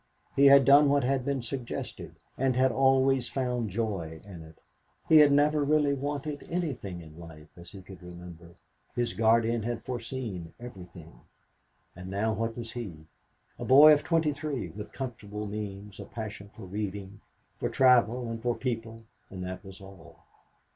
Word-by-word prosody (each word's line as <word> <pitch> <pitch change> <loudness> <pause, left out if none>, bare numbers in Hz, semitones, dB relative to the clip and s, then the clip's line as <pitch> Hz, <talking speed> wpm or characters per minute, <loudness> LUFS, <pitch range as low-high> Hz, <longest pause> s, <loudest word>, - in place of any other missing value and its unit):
He 140 +1 +6
had 140 -1 +7
done 140 +2 +7
what 140 -1 +2
had 130 0 0
been 135 -2 -2
suggested, 120 0 -6 0.2
and 130 -1 0
always 130 0 +3
found 125 -4 -2
joy 95 -6 -3
in 95 -5 -10
it. 80 0 -14 0.5
He 160 - +7
had 150 -2 +7
never 145 +1 +3
really 145 0 +2
wanted 145 +1 -4
anything 130 - -4
in 80 +1 -14
life, 80 -2 -12
as 85 0 -12
he 95 -2 -11
could 95 -1 -13
remember. 85 -1 -12 0.4
His 120 -1 -1
guardian 115 +1 +2
had 120 +2 -4
foreseen 115 -8 -6
everything. 90 - -12 0.7
And 90 +1 -9
now 105 +3 0
what 115 +1 -3
was 115 -1 -6
he? 90 -11 -7 0.5
A - - -4
boy 150 +4 +8
of 150 - +1
23, 150 - -1
with 105 0 -9
comfortable 105 -5 -6
means, 100 -1 -7
a 100 - -7
passion 105 -2 -8
for - - -11
reading, 100 0 -6 0.3
for - - -3
travel 125 -2 +3
and 115 0 -5
for 120 0 0
people, 115 -3 -4 0.3
and 95 -1 -7
that 95 +3 -7
was 95 0 -12
all. 85 -5 -15
115 Hz, 160 wpm, -28 LUFS, 95-135 Hz, 0.7 s, boy